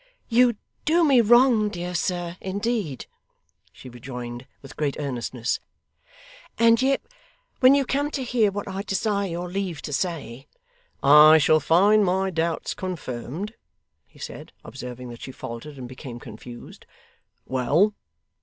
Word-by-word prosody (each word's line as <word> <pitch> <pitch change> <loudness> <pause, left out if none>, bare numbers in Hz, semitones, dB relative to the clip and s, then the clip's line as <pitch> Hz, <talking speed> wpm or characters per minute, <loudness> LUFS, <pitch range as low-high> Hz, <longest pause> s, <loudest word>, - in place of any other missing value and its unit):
'You 240 0 +4 0.3
do 335 +2 +3
me 275 -6 +5
wrong, 235 -1 +5
dear 180 -2 -5
sir, 175 -1 -2
indeed,' 200 - -3 0.7
she - - -13
rejoined 120 0 -8 0.2
with 135 - -12
great 145 -2 -1
earnestness; 125 -4 -3 1.0
'and 230 0 +5
yet 270 +1 +1 0.6
when 260 0 +7
you 280 -1 +2
come 285 +3 0
to 275 -3 -3
hear 235 -4 +2
what 200 +1 -5
I 195 0 -4
desire 200 0 -1
your 175 +1 -4
leave 180 -6 -4
to 145 - -5
say 140 -6 -3 0.3
' 485 0 -38
'I 150 +3 +8
shall 155 +1 +4
find 200 +7 +4
my 190 0 +1
doubts 165 -1 -2
confirmed?' 175 - -5 0.5
he - - -23
said, - - -9
observing 125 0 -8
that 120 -1 -10
she 130 - -7
faltered 130 +4 -8
and 125 -2 -7
became 125 -1 -9
confused. 120 +1 -11 0.6
'Well! 145 - +2
175 Hz, 140 wpm, -24 LUFS, 130-215 Hz, 1.0 s, I